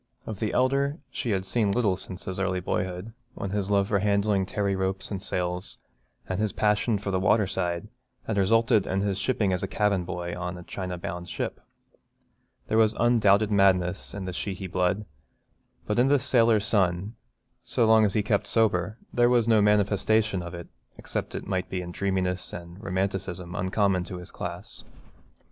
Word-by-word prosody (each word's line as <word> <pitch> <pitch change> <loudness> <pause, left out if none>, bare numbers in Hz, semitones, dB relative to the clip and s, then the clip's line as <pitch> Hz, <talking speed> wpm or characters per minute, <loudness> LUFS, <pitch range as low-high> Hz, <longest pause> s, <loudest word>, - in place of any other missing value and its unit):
Of 110 -3 -6
the 110 - -1
elder 140 +3 +1
she 120 - -3
had 95 -3 0
seen 105 -1 +1
little 105 -4 +2
since 90 0 -5
his 95 0 -4
early 95 -1 0
boyhood, 90 +4 -3 0.2
when 100 - -4
his 100 -1 -1
love 100 -1 +3
for 100 - +2
handling 100 -1 +1
tarry 100 -1 0
ropes 95 +1 -2
and 95 -2 -3
sails, 90 -1 -2 0.5
and 95 +1 -2
his 105 -2 0
passion 105 +1 +2
for 100 0 -4
the 95 - +1
water 105 +2 +3
side, 90 0 -2 0.4
had 110 - -2
resulted 110 +1 +3
in 95 +1 0
his 100 -1 -1
shipping 100 -2 +1
as 90 +2 -2
cabin 105 -3 +1
boy 85 -1 -4
on 90 0 -4
a 90 - -9
China 90 0 -5
bound 85 +1 -6
ship. - - -4 1.1
There 110 - +2
was 110 0 +4
undoubted 110 -3 +4
madness 95 -2 +2
in 100 -2 -5
the 90 - -4
Sheehy 95 +1 -4
blood, 95 +3 0 0.8
but 105 +3 0
in 125 - +5
this 140 -3 +3
sailor 115 -3 +4
son, 100 -1 +1 0.5
so 115 - +1
long 110 0 +6
as 100 -3 +1
he 105 - +2
kept 100 -1 0
sober, 105 -2 +1 0.2
there 120 0 +4
was 120 -2 +3
no 110 -2 +5
manifestation 105 0 +2
of 85 0 -7
it 85 -1 -8 0.3
except - - -4
it - - -5
might 95 0 -2
be 95 - -2
in 85 - -7
a - - -12
dreaminess 95 -2 -1
and 85 +4 -9
romanticism 95 -2 -2
uncommon 95 +1 +1
to 90 - -6
his 90 - -10
class. - - -7
100 Hz, 185 wpm, -27 LUFS, 90-110 Hz, 1.1 s, long